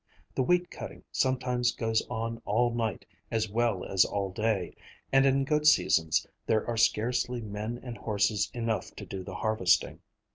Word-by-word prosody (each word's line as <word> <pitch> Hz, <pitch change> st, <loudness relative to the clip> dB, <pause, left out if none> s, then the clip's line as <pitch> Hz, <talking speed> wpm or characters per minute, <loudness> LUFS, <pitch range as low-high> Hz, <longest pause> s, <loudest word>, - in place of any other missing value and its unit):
The -, -, 0 dB
wheat 180 Hz, +6 st, +2 dB
cutting -, -, -8 dB
sometimes 125 Hz, -2 st, +1 dB
goes 110 Hz, -1 st, +1 dB
on 115 Hz, -1 st, -3 dB
all 120 Hz, +3 st, +1 dB
night 115 Hz, -4 st, -2 dB, 0.2 s
as 110 Hz, -1 st, 0 dB
well 115 Hz, -4 st, 0 dB
as 95 Hz, -1 st, +4 dB
all 100 Hz, -2 st, -2 dB
day, 105 Hz, -3 st, -1 dB, 0.4 s
and 135 Hz, 0 st, +6 dB
in 135 Hz, 0 st, +2 dB
good 150 Hz, +1 st, +2 dB
seasons 80 Hz, -, +4 dB, 0.2 s
there 110 Hz, -1 st, +2 dB
are 120 Hz, -, -2 dB
scarcely 120 Hz, +2 st, +1 dB
men 110 Hz, +2 st, -5 dB
and 120 Hz, -2 st, -7 dB
horses 105 Hz, -1 st, +1 dB
enough 115 Hz, -4 st, -3 dB
to -, -, -8 dB
do 95 Hz, -1 st, -6 dB
the 95 Hz, 0 st, -8 dB
harvesting. 105 Hz, -4 st, +1 dB
115 Hz, 160 wpm, -29 LUFS, 105-125 Hz, 0.4 s, and